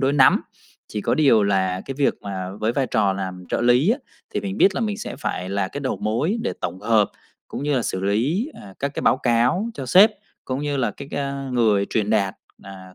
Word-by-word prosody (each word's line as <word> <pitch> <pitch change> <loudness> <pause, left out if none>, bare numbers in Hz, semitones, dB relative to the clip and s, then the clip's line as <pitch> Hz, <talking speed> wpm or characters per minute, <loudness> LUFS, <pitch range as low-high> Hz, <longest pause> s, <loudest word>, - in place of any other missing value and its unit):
đối 135 0 +2
nắm. 135 -3 +5 0.5
Chỉ 105 - -4
có - - +1
điều 135 -8 +4
là 95 -2 +1
cái 135 - -5
việc 140 - +2
mà 95 -2 -4
với 110 +2 +1
vai 135 +1 0
trò 105 -6 +2
làm 95 -1 -5
trợ - - -1
lý 125 - +4
á 245 - +1 0.4
thì 210 - 0
mình 200 -1 -4
biết 190 -2 +4
là - - -2
mình 215 -2 -1
sẽ - - -6
phải 90 -9 -3
là 100 -1 -1
cái 145 - -6
đầu 135 - -2
mối 125 - 0
để 235 - -1
tổng 90 +2 -4
hợp 110 -3 +3 0.4
cũng - - -5
như 145 -1 0
là 125 - +1
xử 95 - -2
lý, 130 - 0
ờ, 95 -2 -12
các 140 +1 -3
cái - - -2
báo - - +4
cáo 125 - +1
cho 135 - -6
sếp 190 - +7 0.3
cũng 130 0 -3
như 145 -1 -1
là 130 - 0
cái, 140 - -10
a, 140 -1 -3
người 105 -5 +3
truyền 105 -2 0
đạt, 100 -3 +1 0.3
à, 95 -1 -11
120 Hz, 235 wpm, -22 LUFS, 100-145 Hz, 0.5 s, sếp